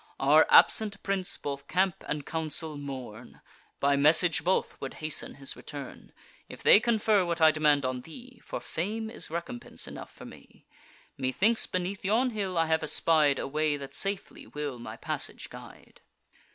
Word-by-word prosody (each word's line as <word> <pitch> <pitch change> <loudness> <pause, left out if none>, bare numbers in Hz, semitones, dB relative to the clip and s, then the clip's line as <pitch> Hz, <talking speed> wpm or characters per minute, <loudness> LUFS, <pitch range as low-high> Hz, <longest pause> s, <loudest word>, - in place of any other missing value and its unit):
Our 150 +3 +5
absent 205 -2 +5
prince 195 -2 -2
both 140 -1 -6
camp 185 0 0
and 150 -1 -3
council 160 -1 -3
mourn; 130 -5 -8 0.4
By 140 0 +3
message 155 +3 +5
both 185 +3 0
would 135 - -6
hasten 155 -1 -4
his 135 -1 -5
return: 140 -2 -9 0.4
If - - -11
they - - +8
confer 220 -3 +2
what 170 -1 -2
I 160 -1 +7
demand 150 -3 +2
on 130 -1 -2
thee, 245 - -13
(For - - -5
fame 220 +6 -4
is - - -4
recompense 165 -7 -5
enough - - -9
for - - -13
me,) - - -15 0.5
Methinks, 190 - +1
beneath 185 +2 -3
yon 230 +6 +2
hill, 195 -5 -3
I 165 - +3
have 160 0 +1
espied 155 -2 +2
A - - -3
way 150 +1 0
that 140 -1 -9
safely 195 -1 -4
will 145 -4 -5
my 115 - -8
passage - - -4
guide." - - -13
160 Hz, 165 wpm, -28 LUFS, 140-195 Hz, 0.5 s, they